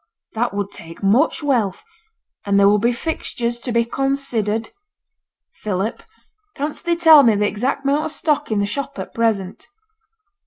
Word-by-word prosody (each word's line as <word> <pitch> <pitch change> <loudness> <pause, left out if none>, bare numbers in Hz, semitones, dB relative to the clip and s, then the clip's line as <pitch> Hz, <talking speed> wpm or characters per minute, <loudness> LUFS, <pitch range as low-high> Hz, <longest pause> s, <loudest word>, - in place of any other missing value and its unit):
That 230 -1 -1
would 200 -1 -3
take 165 +4 -11
much 240 +11 +2
wealth. 235 -10 0 0.6
And 200 -1 +2
there 200 - +6
will 210 +1 +4
be 235 +4 +2
fixtures 240 -3 -3
to 245 - -4
be 235 0 +2
considered. 235 -5 -1 0.9
Philip, 210 +2 -2 0.5
canst 290 +2 -5
thee 345 0 +2
tell 320 -3 +8
me 230 -5 +4
the 210 +1 +1
exact 245 +8 -2
amount 285 +2 +1
of - - -4
stock 300 -5 -1
in 215 - +1
the 200 - +1
shop 275 +7 -4
at - - -7
present?' 210 -5 -1
235 Hz, 160 wpm, -20 LUFS, 205-275 Hz, 0.9 s, tell